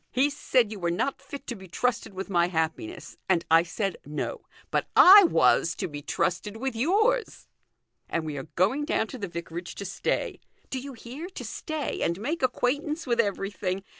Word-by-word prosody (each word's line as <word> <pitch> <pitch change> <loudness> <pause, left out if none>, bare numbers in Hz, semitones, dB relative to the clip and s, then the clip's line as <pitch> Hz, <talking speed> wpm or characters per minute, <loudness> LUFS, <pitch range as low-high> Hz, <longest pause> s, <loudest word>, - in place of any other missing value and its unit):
He 275 +3 +2
said 245 -5 +1
you 210 - -6
were 175 -1 0
not 185 +11 -1
fit 280 0 -9
to 240 - -4
be 190 -2 -12
trusted 235 +7 -1
with 190 +1 -4
my 175 -3 +2
happiness, 175 - -3
and 170 -3 +2
I 165 0 +8
said 195 +2 -3
no; 150 - -5 0.2
but - - 0
I 395 +1 +10
was 170 - +3
to 190 - -3
be 145 -3 -7
trusted 190 +7 -1
with 265 +1 -3
yours. 435 - +1 0.6
And 165 -1 -1
we 155 -2 -4
are 135 - -6
going 215 +12 +2
down 220 - +1
to 255 - -7
the 200 - -3
vicarage 170 0 -6
to 200 - -6
stay; 195 0 -2 0.3
do 265 - -2
you 275 +1 -8
hear, 255 +8 -8
to 385 - -8
stay, 310 -2 -4
and 170 +2 0
make 305 +10 -2
acquaintance 285 +5 0
with 235 -3 0
everything. 195 -3 -1
220 Hz, 190 wpm, -27 LUFS, 175-280 Hz, 0.6 s, I